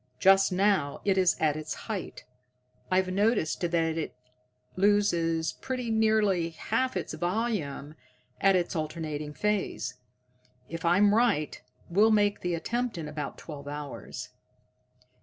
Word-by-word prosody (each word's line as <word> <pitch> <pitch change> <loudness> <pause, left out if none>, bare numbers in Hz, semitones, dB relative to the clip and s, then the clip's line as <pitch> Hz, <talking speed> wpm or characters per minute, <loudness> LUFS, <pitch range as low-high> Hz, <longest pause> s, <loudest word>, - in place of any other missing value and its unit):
Just 195 0 +5
now 185 -6 +1
it 195 -2 +3
is 185 -2 +3
at 155 -2 +2
its 155 0 -4
height. 210 -5 -5 0.6
I've 185 0 +2
noticed 205 -4 +1
that 175 -1 0
it 165 -3 -1 0.6
loses 170 -5 +2
pretty 250 -3 -4
nearly 215 -6 +2
half 230 +10 -1
its - - -4
volume 175 -7 -2 0.5
at 195 -1 +4
its 180 0 0
alternating 155 -2 -3
phase. 210 -10 -1 0.7
If 165 +1 -6
I'm 200 +4 +5
right, 215 -10 +1 0.3
we'll 205 +6 +4
make 205 -2 +3
the 175 -1 -1
attempt 240 +6 -2
in 160 -2 -4
about 150 -1 -5
twelve 145 -3 -9
hours." 145 -1 -6
180 Hz, 125 wpm, -28 LUFS, 160-210 Hz, 0.7 s, Just